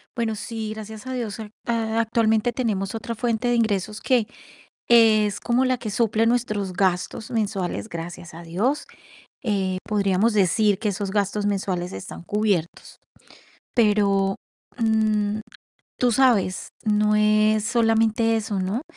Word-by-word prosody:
Bueno, 230 -3 -1
sí, 220 0 -5
gracias 220 +2 -9
a 260 - -3
Dios, 230 -5 -4
a 215 -1 -7 0.2
a 225 -1 0
actualmente 225 0 +1
tenemos 215 -5 -2
otra 230 +1 -4
fuente 235 +1 -1
de 240 - +2
ingresos 215 -2 -1
que, 245 -5 +2 0.6
es 215 -3 +5
como 245 +2 +1
la 255 0 +1
que 225 -3 -5
suple 220 +1 +1
nuestros 215 -5 0
gastos 180 +3 -1
mensuales, 205 -4 -2
gracias 170 0 -7
a 165 - -9
Dios, 200 - -1 0.6
eh, 195 -5 0
podríamos 205 +1 +1
decir 205 +1 +2
que 220 -2 0
esos 200 0 -3
gastos 205 0 0
mensuales 190 -3 -1
están 85 -3 -8
cubiertos, 205 - -2 0.8
pero, 200 -3 +3 0.4
mm, 215 -2 +1 0.6
tú 245 -1 +2
sabes, 230 -7 +2 0.2
no 210 0 +2
es 215 0 +3
solamente 225 -1 +2
eso, 210 -3 -2
¿no? 195 +7 -2
215 Hz, 135 wpm, -23 LUFS, 200-225 Hz, 0.8 s, es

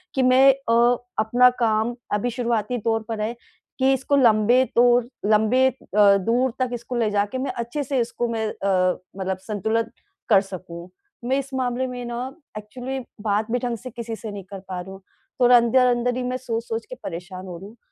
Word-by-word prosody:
कि 265 - +2
मैं 260 +2 +6
अ, 240 -2 +2 0.2
अपना 245 +3 +5
काम 225 +1 +1 0.2
अभी 210 +4 0
शुरुआती 240 -1 -1
दौर 225 0 0
पर 220 -2 -3
है 225 +3 -2 0.4
कि 265 +1 +4
इसको 270 +2 0
लम्बे 240 -1 +4
दौर 240 0 +5 0.2
लंबे 220 +5 +4
अ, - - -9 0.2
दूर 210 +5 +4
तक 255 - +1
इसको 240 +1 -5
ले 225 -3 +1
जाके 205 +4 0
मैं 260 0 -2
अच्छे-से 260 +3 -3
इसको 235 0 -2
मैं 220 -1 -1
अ, 185 -3 0 0.2
मतलब 190 -1 -2
संतुलन 220 +2 -1 0.4
कर 200 -4 +6
सकूँ। 180 -3 -9 0.4
मैं 260 +2 +1
इस 275 0 -7
मामले 255 0 -1
में 250 -1 -6
ना 240 0 -4 0.4
एक्चुअली 250 +5 -6 0.2
बात 210 +1 -1
भी 245 - +1
ढंग 240 -1 -2
से 255 +4 -9
किसी 230 0 -6
से 220 -1 -7
नहीं 200 -1 -7
कर 195 - -6
पा 185 -1 -4
रही 190 - -10
हूँ। 195 0 -11 0.4
थोड़ा 245 0 +7
अंदर-अंदर 245 +1 +2
ही 255 - -2
मैं 250 +1 -2
सोच-सोच 230 -2 -4
के 255 - -6
परेशान 185 +2 -7
हो 175 -2 -7
रही 190 +4 -10
हूँ। 225 +3 -16
235 Hz, 190 wpm, -23 LUFS, 210-250 Hz, 0.4 s, थोड़ा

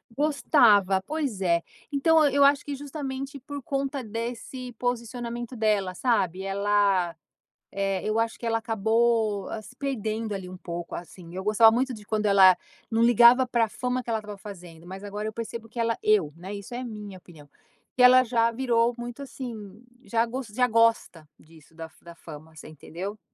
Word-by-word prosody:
gostava. 230 - +3
Pois 285 -10 -3
é, 170 -2 +2 0.3
então 310 +2 +4
e 275 - -4
eu 285 - +5
acho 280 +1 +4
que 285 - -5
justamente 275 -1 -6
por 285 +1 -8
conta 275 0 -3
desse 240 +3 -6
posicionamento 240 0 -4
dela, 210 -5 0
sabe, 190 -7 0
ela, 195 -3 +1 0.6
eh, 195 -1 -1
eu 215 +1 0
acho 225 0 -1
que 235 - -7
ela 225 0 +1
acabou 220 -1 +1
se 250 - -15
perdendo 225 -5 -3
ali 190 -2 -6
um 185 - -9
pouco, 170 -1 -6
assim. 175 0 -10
Eu 190 - -4
gostava 215 +2 +6
muito 255 +2 0
de 210 -3 -11
quando 215 0 -1
ela 190 -2 +7 0.3
não 225 0 +2
ligava 240 +2 +6
pra 235 -2 +1
fama 250 +3 -3
que 240 - -10
ela 225 - 0
estava 210 -1 -9
fazendo. 175 -4 -11
Mas 190 +2 -9
agora 205 +1 -5
eu 220 - -5
percebo 230 0 -6
que 235 +1 -9
ela 230 0 0
eu, 190 -9 +2
né, 185 +4 -8
isso 200 +4 -9
é 245 - -4
a 255 - -5
minha 210 -4 -8
opinião, 160 -5 -16 0.4
que 250 - -1
ela 255 +1 +8
já 230 -1 +2
virou 235 -1 +1
muito 240 +3 -7
assim, 230 -5 -8 0.2
já 230 -2 +1
gos 245 +1 -5
já 250 +4 +1
gosta 230 -8 +1
disso 160 0 -20
da 165 0 -8
fa - - -28
da 170 0 -11
fama, 160 -1 -12
você 155 - -11
entendeu, 175 +7 -8
225 Hz, 185 wpm, -26 LUFS, 195-245 Hz, 0.6 s, ela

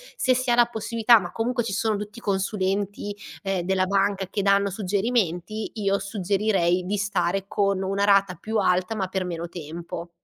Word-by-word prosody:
se 255 - +2
si 255 0 -1
ha 240 - +4
la 240 0 +6
possibilità, 230 0 +3
ma 175 -2 -6
comunque 240 +2 -1
ci 215 -3 -3
sono 215 0 0
tutti 210 +3 -7
i 235 - -9
consulenti, 200 +1 -1 0.3
ehm, 195 -2 -1
della 190 +1 +1
banca 195 0 +1
che 205 - -1
danno 200 0 +3
suggerimenti, 205 0 -1
io 200 -2 +1
suggerirei 195 -3 0
di 205 +1 0
stare 195 -1 0
con 200 -2 0
una 195 +1 0
rata 195 -2 +4
più 220 +6 -4
alta 185 +2 +1
ma 195 - -1
per 190 -1 -2
meno 170 -1 -4
tempo. 170 +1 -7
200 Hz, 180 wpm, -25 LUFS, 185-215 Hz, 0.3 s, la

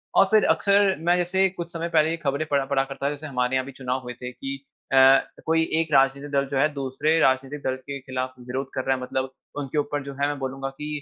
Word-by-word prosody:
और 195 - +7
फिर 215 -1 +5
अक्सर 200 -1 +3
मैं 170 +2 +2
जैसे 190 +2 +2
कुछ 170 -2 -7
समय 170 0 -3
पहले 155 -2 +3
ये 165 - -1
खबरें 145 -1 -1
पढ़ा 140 -1 +2
पढ़ा 135 0 +1
करता 135 0 -6
था। - - +3
जैसे 150 +1 -7
हमारे 125 -2 0
यहाँ 130 0 0
भी 140 - -8
चुनाव 130 0 -3
हुए 125 0 -6
थे 125 0 -5
कि 135 +2 -6 0.3
अ, - - +4 0.5
कोई 160 0 +3 0.2
एक 160 -2 -4
राजनीतिक 135 +1 +3
दल 140 -1 +2
जो 135 - -2
है, 140 +3 +4
दूसरे 140 +4 0
राजनीतिक 135 +1 +1
दल 130 - 0
के 140 +2 -7
खिलाफ 130 -1 -4
विरोध 130 +2 -3
कर 130 - -2
रहा 135 - +2
है, 130 - -6
मतलब 130 +1 -3 0.3
उनके 145 +1 -4
ऊपर 145 -1 -1
जो 140 0 -7
है 140 +1 0
मैं 145 0 -2
बोलूंगा 135 0 -4
कि 140 +2 -7
140 Hz, 250 wpm, -24 LUFS, 130-155 Hz, 0.5 s, और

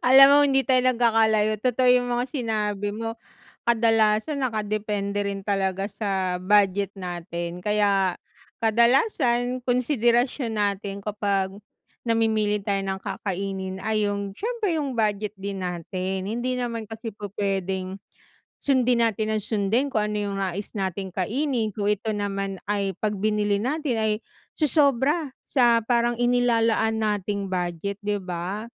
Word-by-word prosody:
Alam 270 +2 +9
mo, 285 - +7
hindi 270 -1 +3
tayo 260 -1 +3
nagkakalayo. 220 -2 +3
Totoo 255 +1 +2
yung 250 0 +3
mga 245 0 +1
sinabi 210 -5 -2
mo. 225 +1 -5 0.5
Kadalasan, 225 +4 +2
nakadepende 210 -3 -1
rin 195 -1 -4
talaga 195 -1 0
sa 190 -4 -2
budget 200 0 +3
natin, 175 -1 -5
kaya, 200 -2 +2 0.4
kadalasan 245 - +2
konsiderasyon 245 -1 +1
natin 200 -1 -2
kapag 200 -2 -1 0.6
namimili 220 -2 +1
tayo 200 0 0
ng 190 0 -3
kakainin 190 -1 -4
ay 215 -1 0
yung 200 0 -3
siyempre, 435 -6 -1
yung 280 -4 -2
budget 210 -2 0
din 195 0 -5
natin. 185 +2 -3
Hindi 240 +3 -1
naman 235 -2 -3
kasi 225 +2 -7
pu-pwedeng, 195 -2 -3 0.7
sundin 250 -3 +3
natin 220 -1 0
nang 215 - 0
sundin 220 +6 +1
kung 210 -1 +1
ano - - -2
yung 200 - -3
nais 195 +1 -3
nating 190 -1 -3
kainin 235 - 0
kung 205 0 -2
ito 210 +1 -1
naman, 195 -1 -2
ay 200 -1 0
kapag 210 -1 -1
binili 210 -1 +1
natin, 275 +1 -1
ay 220 -1 +2 0.4
sosobra 290 0 +2 0.2
sa 240 -3 +4
parang 240 0 +1
inilalaan 230 -2 +2
nating 205 -2 -1
budget, 180 +2 -2
'di 210 0 0
ba? 180 +4 -4
210 Hz, 130 wpm, -25 LUFS, 195-240 Hz, 0.7 s, Alam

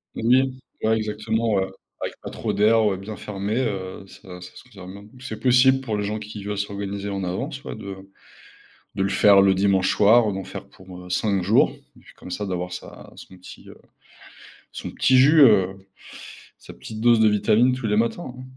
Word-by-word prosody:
Oui, 130 +3 +1 0.2
ouais, 110 0 +2
exactement, 110 +1 -2
ouais, 95 -1 +1 0.3
avec - - -4
pas - - -7
trop - - -3
d'air, 110 +1 +3
ouais, 95 -3 0
bien 105 +2 -8
fermé, 105 +2 -4
heu, 95 -5 -4
ça 90 -2 -13
ça 90 - -11
se - - -13
conserve 95 -7 -12
bien, 100 +1 -12
c'est 125 -4 -7
possible 130 +1 +4
pour 110 -5 -3
les 105 - -2
gens 105 +1 -3
qui 105 -1 -9
veulent 105 0 -4
s'organiser 100 0 -4
en 95 -1 -4
avance, 90 +1 -5
ouais, - - -7
de 100 -1 -8 1.0
de 95 - -1
le 95 - +1
faire 100 0 +5
le 95 -1 +4
dimanche 95 -1 +2
soir, 110 0 +4
d'en 95 -1 -5
faire, - - -9
pour, 90 -1 -13
heu, 90 - -13
5 100 -1 0
jours 100 +5 +3 0.3
et - - -18
puis - - -19
comme 90 - -12
ça, 105 +3 -4
d'avoir 90 -1 -4
sa 90 - -10
son 95 - -13
petit, 90 - -14
heu, - - -13 1.0
son - - -7
petit 130 0 +3
jus, 150 +5 +5
heu, 95 -5 +4 0.7
sa - - -13
petite 110 -1 -10
dose 120 -1 +4
de 110 - +5
vitamines 110 +4 +2
tous 125 -3 -4
les 105 - +1
matins, 120 +4 -2
hein. 130 - -9
105 Hz, 205 wpm, -23 LUFS, 95-115 Hz, 1.0 s, faire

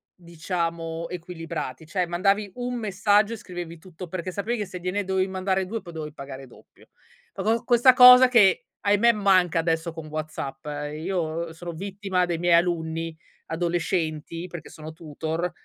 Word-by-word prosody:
diciamo 170 -1 -4
equilibrati. 165 -5 -6
Cioè 180 +3 -1
mandavi 195 +3 +1
un 245 0 -3
messaggio 210 0 +2
e - - -3
scrivevi 175 -3 -7
tutto, 180 +1 -10
perché 185 +1 -5
sapevi 220 +6 -2
che 205 - -1
se 180 - -8
gliene 185 +3 -2
dovevi 190 0 0
mandare 190 0 -1
2 225 +3 -4
poi 170 - -11
dovevi 155 -2 -6
pagare 135 -2 -9
doppio. 120 - -20 0.5
Co 195 - -5
co 225 +3 +1
questa 245 +1 +6
cosa 250 0 +10
che, 220 -7 +4
ahimè, 205 +3 +4
manca 185 -5 +3
adesso 165 0 0
con 160 -1 -8
WhatsApp, 150 -3 -6
ehm, 145 0 -4
io 170 -3 -2
sono 170 +1 -7
vittima 190 +1 -2
dei 175 -2 -2
miei 175 0 +2
alunni 165 -1 0 0.3
adolescenti, 165 -1 -2
perché 170 -2 -9
sono 155 0 -9
tutor, 160 +2 -4
175 Hz, 160 wpm, -25 LUFS, 160-195 Hz, 0.5 s, cosa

